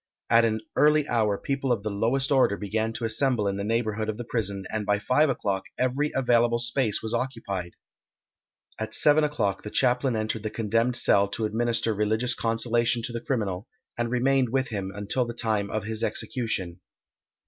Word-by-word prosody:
At 115 0 +6
an 110 -1 0
early 150 0 +4
hour 110 -4 +1
people 135 +1 -2
of 110 -4 0
the 110 - -2
lowest 120 +7 +1
order 130 -7 +3
began 110 +2 -2
to 115 - -3
assemble 115 -1 +1
in 100 0 -1
the 100 - -3
neighbourhood 110 0 -1
of 110 - -3
the 120 - -5
prison, 100 -5 -2
and 110 -1 -2
by 105 0 +1
five 130 +8 +2
o'clock 100 -7 -1
every 130 +4 0
available 120 -2 +3
space 120 -2 +1
was 110 - -3
occupied. 100 -9 -3 1.0
At 110 0 -3
seven 150 +1 +4
o'clock 115 -11 -1
the 105 - -7
chaplain 125 +1 +1
entered 110 0 -2
the 110 - -3
condemned 115 +3 0
cell 100 -4 +4
to 105 +3 -3
administer 115 +1 0
religious 110 +4 0
consolation 115 +1 0
to 120 - -4
the 115 - -4
criminal, 105 -7 -2 0.3
and 120 0 -2
remained 130 +1 +2
with 130 0 0
him 100 -4 -4
until 105 +6 -1
the 120 -1 -6
time 105 -4 0
of 110 +1 -2
his 110 +1 -4
execution. 95 -8 -2
115 Hz, 180 wpm, -26 LUFS, 105-125 Hz, 1.0 s, At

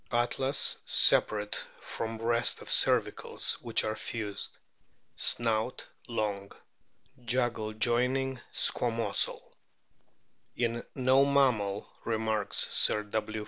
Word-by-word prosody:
Atlas 130 +3 0
separate 105 -1 +3 0.2
from 115 0 -5
rest 115 +1 +1
of - - -10
cervicals, - - +2
which 115 -2 0
are 110 0 -2
fused. 105 -2 -6 0.6
Snout 115 +1 0 0.2
long; 105 -4 -3 0.7
jugal 120 -3 -1
joining 125 +3 0
squamosal. 115 -1 0 1.2
"In 120 0 -1
no 130 +1 +4
mammal," 125 -8 +1 0.2
remarks 110 -2 +1
Sir 105 - +3
W. 110 +1 -4
115 Hz, 90 wpm, -29 LUFS, 110-125 Hz, 1.2 s, no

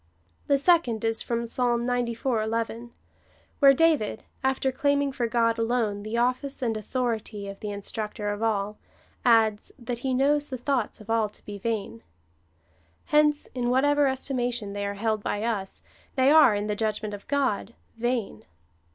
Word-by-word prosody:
The 280 - +4
second 275 - +2
is 225 0 +1
from 235 0 -2
Psalm 240 0 0
xciv. 245 -1 0
11, 230 +1 -3 0.7
where 275 -2 +8
David, 285 -7 +2 0.2
after 265 0 +1
claiming 285 +1 +1
for 245 -3 -1
God 230 -1 +1
alone 225 -3 0
the 215 +3 -4
office 255 +3 0
and 230 -2 0
authority 220 -2 -3
of 195 0 -8
the 210 - -5
In 200 0 -5
structor 210 0 -4
of 205 - -7
all, 210 -2 -1 0.4
adds, 220 -3 +3
that 240 -1 -5
He 260 0 -1
knows 290 +2 +2
the 260 - -5
thoughts 250 -3 -1
of 215 +1 -7
all 225 -2 +2
to - - -16
be 205 -1 -7
vain. 200 - -3 1.0
Hence, 300 0 +3
in 245 -1 -1
whatever 290 +3 +3
estimation 245 -5 -2
they 200 0 -2
are 200 - -4
held 215 +1 -1
by 205 +1 -2
us, 210 -5 -3 0.3
they 265 +1 +4
are, 305 -9 +7
in 205 0 -2
the 210 0 -1
judgment 215 -1 -2
of 205 - -9
God, 265 -6 -1 0.2
vain. 235 - -2
235 Hz, 165 wpm, -26 LUFS, 215-260 Hz, 1.0 s, where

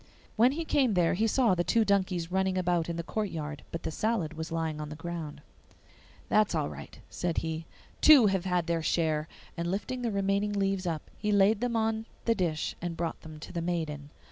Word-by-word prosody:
When 240 +4 +5
he 330 +2 -3
came 260 -9 +2
there 175 -2 +3
he 220 +5 +1
saw 235 -2 +3
the 175 -1 +1
two 225 +4 +2
donkeys 185 -4 +1
running 190 0 +1
about 175 -2 +1
in 170 - -2
the 170 - -3
courtyard, 160 -8 -3
but 165 - -5
the - - -2
salad 190 -4 -1
was 160 0 -6
lying 160 -2 -2
on 150 - -5
the 150 - -7
ground. 160 -3 -6 0.8
'That's 215 -4 +3
all 150 -3 0
right,' - - -10
said 175 -2 -3
he; 160 0 -4 0.3
'two 290 -7 +8
have 195 -2 +1
had 180 -2 +1
their 170 -1 0
share!' 155 -1 0 0.3
And 170 0 -2
lifting 210 +7 -3
the 240 - 0
remaining 200 0 0
leaves 195 -2 0
up, 160 -3 -4
he 210 0 0
laid 205 +2 +4
them 245 -1 0
on 220 0 0 0.2
the 230 - +4
dish 170 -7 -1
and 170 -1 -4
brought 170 -1 -3
them 155 -1 -10
to - - -9
the 170 - -2
maiden. 160 -4 -3
180 Hz, 210 wpm, -29 LUFS, 165-210 Hz, 0.8 s, two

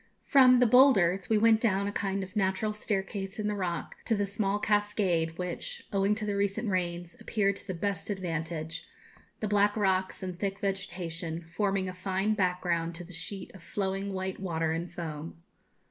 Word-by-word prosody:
From 255 -2 +7
'The 250 - +6
Boulders' 205 -8 +5
we 220 - +4
went 220 0 +5
down 200 -4 +2
a 200 - -1
kind 195 -1 -1
of 190 +3 -10
natural 205 +1 +1
staircase 195 -1 -3
in 210 -1 -1
the 210 - 0
rock 180 -5 -3
to 225 - +2
the 205 -1 +1
small 200 0 0
cascade, 205 -6 +1
which, 180 - -4
owing 200 +1 +3
to 215 0 -3
the 205 -1 -1
recent 200 +2 0
rains, 175 -2 -2
appeared 200 -2 +1
to - - -11
the 185 - -3
best 200 +1 -2
advantage, 165 -4 -3 0.5
the 215 - 0
black 205 +1 +3
rocks 190 -2 +1
and 185 -1 -5
thick 195 -1 -1
vegetation 170 -4 -4
forming 195 -2 +1
a 185 - -4
fine 190 +3 0
background 180 -4 0
to 175 - -7
the 180 +1 -12
sheet 180 +4 -6
of 190 - -12
flowing 195 +3 -2
white 190 0 -3
water 165 -4 -1
and 165 +2 -2
foam. 160 -2 -6
195 Hz, 180 wpm, -30 LUFS, 175-205 Hz, 0.5 s, From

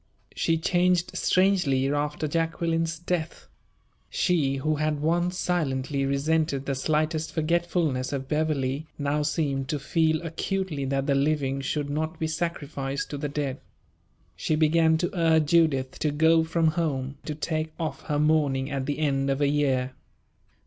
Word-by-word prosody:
She 165 0 +1
changed 180 +1 +1
strangely 180 -9 +2
after 150 +1 -1
Jacqueline's 165 +1 -1
death. 170 -1 -3 0.6
She, 150 -7 +1
who 155 +3 0
had 155 0 0
once 175 +4 0
silently 140 -6 -1
resented 140 0 0
the 140 - -1
slightest 155 +3 0
forgetfulness 165 -4 0
of 135 -2 -3
Beverley, 150 -1 -1
now 145 +1 0
seemed 145 -3 -1
to 155 - 0
feel 160 +2 +1
acutely 165 -2 -2
that 135 0 -1
the 140 - +2
living 140 -1 +1
should 145 +1 -2
not 155 +3 -2
be 160 - -2
sacrificed 150 -4 -3
to 145 - -4
the 145 0 -2
dead. 140 -2 -3 0.8
She 120 - 0
began 160 +1 +4
to 175 +2 -1
urge 160 -3 +3
Judith 145 -6 +2
to 150 - +1
go 160 +2 +4
from 160 0 +2
home; 140 -5 -2
to 150 - -4
take 155 0 -2
off 160 -2 -3
her 145 - 0
mourning 145 -3 +2
at 135 -1 -2
the 145 - -1
end 140 -3 0
of 135 0 0
a 145 -1 +3
year. 135 -3 +1
155 Hz, 150 wpm, -26 LUFS, 140-165 Hz, 0.8 s, began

